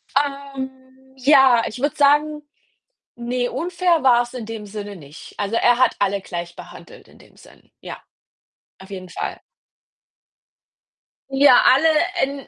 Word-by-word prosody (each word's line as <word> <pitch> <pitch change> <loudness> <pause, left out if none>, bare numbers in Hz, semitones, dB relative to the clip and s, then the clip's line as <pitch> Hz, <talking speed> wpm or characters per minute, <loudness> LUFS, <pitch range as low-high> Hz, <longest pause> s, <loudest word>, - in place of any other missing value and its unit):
Ähm, 265 -2 -5
ja, 265 -3 +5
ich 230 - -8
würde 290 - -1
sagen, 295 +1 +2 0.7
ne, 245 +1 -3
unfair 345 -1 0
war‘s 240 -1 +2
in 235 -4 -7
dem 225 -2 -8
Sinne 205 -1 -8
nicht. 150 -1 -14
Also, 205 +3 -2
er 245 +1 +3
hat 255 - +2
alle 200 0 0
gleich 175 -2 -7
behandelt - - -14
in - - -20
dem - - -22
Sinn. - - -20
Ja, - - -10 0.8
auf 190 +1 -15
jeden 185 -2 -8
Fall. - - -6 1.9
Ja, 270 -2 +5
alle 275 +6 +5 0.4
in 275 0 -4
260 Hz, 135 wpm, -20 LUFS, 215-280 Hz, 1.9 s, ja